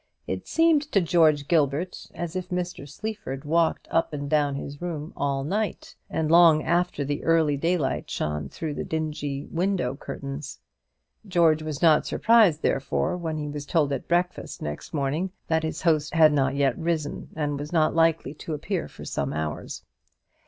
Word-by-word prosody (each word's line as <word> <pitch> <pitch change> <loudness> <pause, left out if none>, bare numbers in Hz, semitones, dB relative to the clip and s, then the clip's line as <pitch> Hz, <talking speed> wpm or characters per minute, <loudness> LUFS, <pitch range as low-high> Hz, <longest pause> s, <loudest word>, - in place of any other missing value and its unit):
It - - -4
seemed 325 -2 +4
to 200 - +6
George 160 -5 +3
Gilbert 155 +2 0
as 175 0 -5
if 185 -1 -4
Mr. 180 -4 -4
Sleaford 150 -5 -6
walked 165 +2 +1
up 165 -1 +1
and 145 -1 -4
down 145 -1 +2
his 140 +1 -7
room 160 -3 -5
all 140 -1 -1
night, 205 +8 -3
and 160 -1 -1
long 165 -2 +7
after 170 -4 0
the 145 +1 -3
early 160 -3 +3
daylight 165 -1 -1
shone 75 -2 -3
through 160 -2 -4
the - - -4
dingy 150 -3 -3
window 175 -7 0
curtains. 140 +1 -7 0.7
George 165 -4 +3
was 155 0 -5
not 155 -2 +5
surprised, 220 -9 +4
therefore, 140 +6 0
when 165 -3 -3
he 150 -1 -3
was 145 -1 -6
told 150 -4 +2
at 135 - -4
breakfast 175 +1 -1
next 75 0 -6
morning 150 +5 -1 0.2
that 160 0 +2
his 160 0 -4
host 155 -2 +2
had 155 -2 +6
not 135 -1 +1
yet 140 -1 +2
risen, 160 -3 -2
and 145 -2 -2
was 145 +1 -6
not 160 -3 +3
likely 165 -4 +2
to 155 +1 -5
appear 170 +4 -3
for - - -11
some 70 -1 -2
hours. 75 0 -4
155 Hz, 170 wpm, -26 LUFS, 145-170 Hz, 0.7 s, long